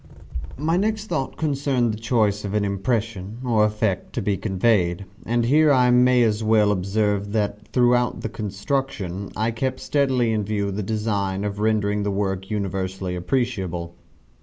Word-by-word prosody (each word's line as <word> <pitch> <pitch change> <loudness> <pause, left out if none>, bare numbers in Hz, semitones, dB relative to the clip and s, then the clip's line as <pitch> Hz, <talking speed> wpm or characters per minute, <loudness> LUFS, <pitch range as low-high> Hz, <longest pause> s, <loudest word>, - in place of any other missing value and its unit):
My 160 +5 +1
next 215 +2 0
thought 160 -9 -3
concerned 140 -6 0
the 105 - -6
choice 110 -3 +1
of 100 0 -3
an 105 -1 +1
impression, 105 0 -2
or 115 -3 +3
effect, 105 -3 -1
to - - -2
be 100 - +1
conveyed: 95 -2 +1 0.2
and 120 +1 +1
here 150 +4 +5
I 125 -2 +4
may 125 0 +5
as 110 -1 +1
well 110 -1 +4
observe 100 +1 0
that 105 -1 -2
throughout 125 +1 +2
the - - -2
construction, 100 -2 -3
I 110 +2 0
kept 130 +3 -2
steadily 130 -5 +1
in 110 -1 0
view 100 -1 -1
the 100 +2 -3
design 100 -2 -1
of 105 0 -3
rendering 105 -1 +1
the 100 - -1
work 95 -1 -2
universally 95 -2 -3
appreciable. 90 -5 -2
105 Hz, 160 wpm, -23 LUFS, 100-125 Hz, 0.2 s, here